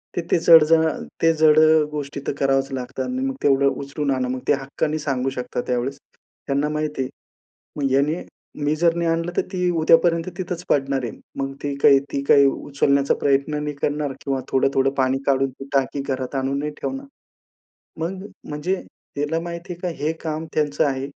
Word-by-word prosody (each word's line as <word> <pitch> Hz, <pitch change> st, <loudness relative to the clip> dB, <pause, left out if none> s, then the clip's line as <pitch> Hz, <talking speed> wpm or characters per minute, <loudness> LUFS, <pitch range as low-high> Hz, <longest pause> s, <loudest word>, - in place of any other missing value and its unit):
तर 175 Hz, -, 0 dB
ते -, -, +4 dB
जड, 165 Hz, -1 st, +8 dB
जड, 160 Hz, +1 st, +4 dB
अ, 160 Hz, -, -1 dB, 0.2 s
ते 165 Hz, 0 st, +5 dB
जड 155 Hz, -1 st, +5 dB
अ, 155 Hz, 0 st, +6 dB
गोष्टी 145 Hz, -1 st, -5 dB
तर -, -, 0 dB
करावच 135 Hz, 0 st, +1 dB
लागतात 130 Hz, 0 st, -4 dB
आणि 255 Hz, +1 st, -3 dB
मग 270 Hz, 0 st, -2 dB
तेवढं 140 Hz, -1 st, +4 dB, 0.2 s
उचलून 140 Hz, 0 st, -2 dB
आणा. 130 Hz, -1 st, 0 dB
मग 130 Hz, 0 st, -3 dB
ते -, -, +5 dB
हक्काने 150 Hz, +3 st, -2 dB
सांगू 135 Hz, -3 st, -1 dB
शकतात 125 Hz, 0 st, -3 dB
त्यावेळेस, 125 Hz, +2 st, -1 dB, 0.5 s
त्यांना 140 Hz, +2 st, 0 dB
माहिती 150 Hz, -2 st, -2 dB
आहे. 130 Hz, -, -2 dB, 0.7 s
मग 140 Hz, -2 st, 0 dB
ह्याने 145 Hz, +5 st, +1 dB, 0.4 s
मी 150 Hz, +1 st, +2 dB
जर 165 Hz, +1 st, +3 dB
नाही 170 Hz, -1 st, 0 dB
आणलं, 165 Hz, +1 st, -1 dB
तर -, -, +3 dB
ती 180 Hz, -1 st, +1 dB
उद्यापर्यंत 165 Hz, +2 st, +4 dB
तिथच 180 Hz, -1 st, -4 dB
पडणार 135 Hz, -2 st, +1 dB
आहे. 115 Hz, -, -4 dB, 0.3 s
मग 135 Hz, 0 st, -2 dB
ती 145 Hz, -1 st, -2 dB
काही, 140 Hz, -1 st, +7 dB
ती 140 Hz, -, -1 dB
काही 140 Hz, -, +7 dB
उचलण्याचा 140 Hz, 0 st, +1 dB
प्रयत्न 145 Hz, +2 st, +1 dB
नाही 150 Hz, -1 st, -3 dB
करणार 145 Hz, 0 st, -1 dB
किंवा 135 Hz, -2 st, -1 dB
थोडं, 135 Hz, +1 st, +2 dB
थोडं 135 Hz, 0 st, +3 dB
पाणी 130 Hz, 0 st, +1 dB
काढून 135 Hz, -1 st, +2 dB
ती 135 Hz, +1 st, -11 dB
टाकी 140 Hz, 0 st, 0 dB
घरात 130 Hz, 0 st, -3 dB
आणून 135 Hz, +1 st, -1 dB
नाही 150 Hz, +1 st, -2 dB
ठेवणार. 270 Hz, +1 st, -4 dB, 1.0 s
मग 185 Hz, +4 st, -4 dB, 0.2 s
म्हणजे 150 Hz, +6 st, -1 dB, 0.4 s
त्याला 150 Hz, +3 st, -1 dB
माहिती 170 Hz, +1 st, -6 dB
आहे 170 Hz, -, -13 dB
का 180 Hz, -, -1 dB
हे 155 Hz, -, +2 dB
काम 160 Hz, 0 st, -3 dB
त्यांचं 150 Hz, -2 st, +1 dB
आहे, 135 Hz, -1 st, -1 dB
145 Hz, 195 wpm, -22 LUFS, 135-160 Hz, 1.0 s, जड